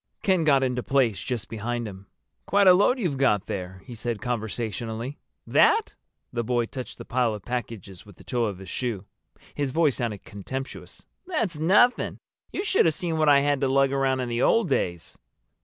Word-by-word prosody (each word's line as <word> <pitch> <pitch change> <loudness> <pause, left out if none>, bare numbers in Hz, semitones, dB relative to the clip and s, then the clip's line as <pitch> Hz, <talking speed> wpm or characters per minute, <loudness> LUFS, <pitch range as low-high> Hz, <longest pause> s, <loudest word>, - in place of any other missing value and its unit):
Ken 185 -4 +3
got 140 -3 +4
into 125 -1 0
place 125 -6 +1
just 120 -5 -3
behind 115 +1 -3
him. 95 -1 -10 0.4
"Quite 200 0 +4
a 185 - +9
load 205 +8 +4
you've 170 - -2
got 105 -7 +2
there," 95 -1 -6
he 125 - -9
said 115 -1 -3
conversationally. 115 +2 -4 0.3
"That?" 435 0 +3 0.4
The 120 -1 -1
boy 120 0 0
touched 130 +2 -7
the - - -9
pile 120 -3 +1
of 105 - -11
packages 115 -7 -5
with 105 -3 -16
the - - -16
toe 120 -2 -1
of 100 -4 -3
his 95 0 -11
shoe. 110 -1 -3 0.5
His 145 -2 -1
voice 150 -1 +2
sounded 115 -6 -3
contemptuous. 130 +7 -7 0.2
"That's 225 - -1
nothing. 205 +10 +3 0.3
You 390 - -3
should 390 - +3
have 160 -2 +3
seen 165 -3 -2
what 155 -1 +4
I 140 -1 +6
had 145 -1 +1
to 135 - +2
lug 135 0 +3
around 135 -1 +1
in 125 - -3
the 120 +1 -1
old 230 +3 +3
days." 85 -2 -2
125 Hz, 190 wpm, -25 LUFS, 110-145 Hz, 0.5 s, a